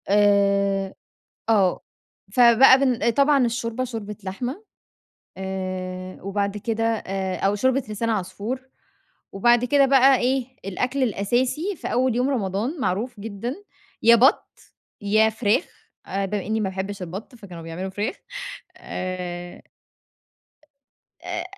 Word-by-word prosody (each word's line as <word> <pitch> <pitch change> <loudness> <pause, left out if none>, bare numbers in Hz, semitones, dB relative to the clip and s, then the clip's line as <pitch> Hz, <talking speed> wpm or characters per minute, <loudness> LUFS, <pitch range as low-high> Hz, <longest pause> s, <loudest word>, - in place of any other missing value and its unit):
آآ 200 -1 +3 0.6
آه، 200 -5 +3 0.5
فبقى 245 +3 +7
بن 250 -4 +2
طبعًا 280 +1 +3
الشوربة 230 +1 -2
شوربة 220 -4 -6
لحمة، 250 - -5 0.7
آآ 185 -1 -5
وبعد 200 +1 -2
كده 225 +2 -2
آآ 195 -4 -1
أو 195 +1 +1
شوربة 260 +5 +1
لسان 215 +2 -2
عصفور 220 +6 -3 0.6
وبعد 240 +4 +3
كده 280 +2 +4
بقى 270 0 +6
إيه، 255 +1 +1 0.2
الأكل 250 +8 -1
الأساسي 250 - 0
في - - -6
أول 250 -1 +1
يوم 250 +3 +1
رمضان 230 - -2
معروف 225 +1 -2
جدًا 225 +4 -4 0.5
يا 235 +1 +8
بَط، 260 +6 +4 0.5
يا 215 +2 +3
فراخ، 220 - +1 0.4
آآ، 195 +1 -1
بما 200 0 -3
إنّي 220 +2 -1
ما 195 - 0
باحبش 190 +1 -5
البَط، 190 +8 -7
فكانوا 185 -7 -10
بيعملوا 165 +4 -5
فراخ 205 - -3 0.6
آآ 180 -1 -5
أ - - -18 1.6
آآ 350 - -3
215 Hz, 120 wpm, -23 LUFS, 195-250 Hz, 1.6 s, يا